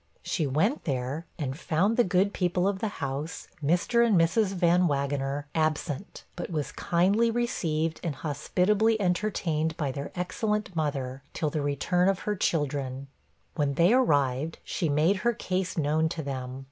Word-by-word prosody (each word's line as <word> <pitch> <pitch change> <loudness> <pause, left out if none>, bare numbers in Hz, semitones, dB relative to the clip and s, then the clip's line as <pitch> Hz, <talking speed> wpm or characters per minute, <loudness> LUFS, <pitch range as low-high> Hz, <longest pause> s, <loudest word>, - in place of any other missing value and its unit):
She 155 -5 -1
went 190 - +1
there, 135 +4 -2
and 135 -5 -3
found 180 +7 +1
the 240 - +5
good 190 +1 +2
people 180 0 +1
of 200 -1 -1
the 220 - -1 0.2
house, 140 +4 -5 0.2
Mr. 180 +10 +3
and 215 -7 +4
Mrs. 180 +6 +3
Van 175 0 +4
Wagener, 140 -1 -1
absent, 155 +1 -2
but 175 - -5
was 155 -4 -2
kindly 195 +7 +2
received 165 -9 -1
and 165 -5 -2
hospitably 185 +10 +1
entertained 180 -5 0
by 145 -4 -1
their 140 +2 -5
excellent 190 +2 -2
mother, 135 -4 -2
till 155 -2 -1
the 150 - -1
return 160 +6 +1
of 195 -1 0
her 210 - -1
children. 140 -6 -1 0.4
When 145 -3 0
they 175 +8 +5
arrived, 145 - +2
she 165 - -2
made 155 +7 +3
her 235 +5 +1
case 185 -4 -2
known 160 +1 +2
to 165 -1 -4
them. 130 -2 -5
165 Hz, 160 wpm, -28 LUFS, 145-190 Hz, 0.4 s, the